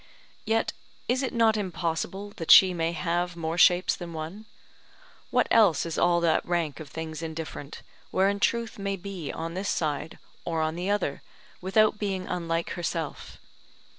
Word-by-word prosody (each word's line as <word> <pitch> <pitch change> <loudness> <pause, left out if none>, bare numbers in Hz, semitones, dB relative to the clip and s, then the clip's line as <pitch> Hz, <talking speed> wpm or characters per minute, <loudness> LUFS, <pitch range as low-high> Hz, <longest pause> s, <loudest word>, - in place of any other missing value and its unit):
Yet 225 0 +1 0.3
is 255 +2 +1
it 265 - -1
not 225 -2 +3
impossible 190 +1 -3
that 165 - -6
she 185 -1 +9
may 165 -1 0
have 175 +1 -1
more 165 0 -3
shapes 180 +2 +5
than 175 -2 -8
one. 165 +7 -6 0.8
What - - +2
else 205 -9 +5
is 165 -1 -4
all 175 0 +4
that 165 -2 +2
rank 170 -4 -1
of 155 -3 -9
things 160 +1 -6
indifferent, 160 -2 -6 0.3
wherein 195 +3 +2
Truth 230 0 0
may 195 0 -1
be 185 -5 -6
on 165 +1 -5
this 190 +2 -3
side 155 0 -2 0.3
or 165 -1 -2
on 155 0 -1
the 175 +3 -3
other, 200 -9 -1 0.4
without 210 +3 +3
being 195 -3 -2
unlike 165 -1 -2
herself? 165 -3 -4
175 Hz, 160 wpm, -27 LUFS, 165-200 Hz, 0.8 s, she